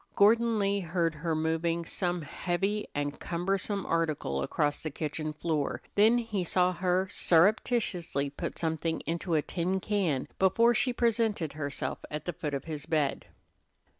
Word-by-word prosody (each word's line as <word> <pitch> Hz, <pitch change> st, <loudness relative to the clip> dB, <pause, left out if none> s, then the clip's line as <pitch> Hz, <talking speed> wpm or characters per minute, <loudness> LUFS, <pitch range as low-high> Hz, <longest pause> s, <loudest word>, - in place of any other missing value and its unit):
Gordon 230 Hz, +2 st, +5 dB
Lee 200 Hz, 0 st, +1 dB
heard 170 Hz, -2 st, 0 dB
her 160 Hz, +1 st, -2 dB
moving 165 Hz, +1 st, 0 dB
some 175 Hz, -1 st, -2 dB
heavy 195 Hz, +7 st, -1 dB
and 145 Hz, 0 st, -2 dB
cumbersome 195 Hz, +3 st, -1 dB
article 155 Hz, -, 0 dB
across 145 Hz, -, 0 dB
the 155 Hz, -, -3 dB
kitchen 155 Hz, +1 st, -3 dB
floor, 150 Hz, -1 st, -2 dB
then 220 Hz, +4 st, +5 dB
he 220 Hz, -5 st, -1 dB
saw 180 Hz, +1 st, +2 dB
her 180 Hz, +1 st, +1 dB
surreptitiously 175 Hz, -, +2 dB
put -, -, -5 dB
something 160 Hz, 0 st, -1 dB
into 170 Hz, +1 st, -2 dB
a 150 Hz, -, +2 dB
tin 185 Hz, +2 st, -1 dB
can 185 Hz, -10 st, 0 dB
before 230 Hz, +5 st, +4 dB
she 250 Hz, +2 st, +2 dB
presented 225 Hz, -9 st, +1 dB
herself 145 Hz, -1 st, -3 dB
at 150 Hz, 0 st, -5 dB
the 175 Hz, -, -2 dB
foot 150 Hz, -3 st, -3 dB
of 135 Hz, -, -4 dB
his 150 Hz, -2 st, -6 dB
bed. 155 Hz, -4 st, 0 dB
170 Hz, 150 wpm, -29 LUFS, 155-200 Hz, -, Gordon